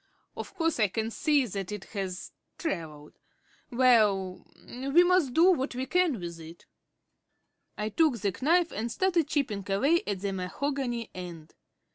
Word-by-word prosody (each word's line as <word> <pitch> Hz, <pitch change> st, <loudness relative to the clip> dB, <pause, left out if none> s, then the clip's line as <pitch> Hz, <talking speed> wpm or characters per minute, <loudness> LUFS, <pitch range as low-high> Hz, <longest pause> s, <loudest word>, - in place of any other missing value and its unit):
Of -, -, -7 dB
course 330 Hz, -6 st, 0 dB
I 215 Hz, -, +4 dB
can 220 Hz, +3 st, -3 dB
see 290 Hz, +2 st, +2 dB
that 195 Hz, -3 st, -5 dB
it 210 Hz, -2 st, -5 dB
has 190 Hz, -3 st, -4 dB, 0.3 s
travelled. 160 Hz, -, -5 dB, 0.5 s
Well, 215 Hz, -7 st, +3 dB, 0.2 s
we 275 Hz, +7 st, +3 dB
must 355 Hz, -8 st, +2 dB
do 350 Hz, +3 st, +6 dB
what 270 Hz, -6 st, -1 dB
we 255 Hz, +1 st, -2 dB
can 355 Hz, -, +1 dB
with 170 Hz, -1 st, -7 dB
it." 165 Hz, +1 st, -12 dB, 1.1 s
I 210 Hz, +1 st, -2 dB
took 295 Hz, +2 st, +2 dB
the 200 Hz, -3 st, -2 dB
knife 340 Hz, +4 st, +3 dB
and 230 Hz, +3 st, -3 dB
started 345 Hz, -3 st, +1 dB
chipping 275 Hz, -10 st, -1 dB
away 280 Hz, +13 st, +3 dB
at 200 Hz, -3 st, -2 dB
the 200 Hz, -1 st, -2 dB
mahogany 240 Hz, +5 st, -3 dB
end. 170 Hz, -3 st, -9 dB
235 Hz, 150 wpm, -28 LUFS, 195-300 Hz, 1.1 s, do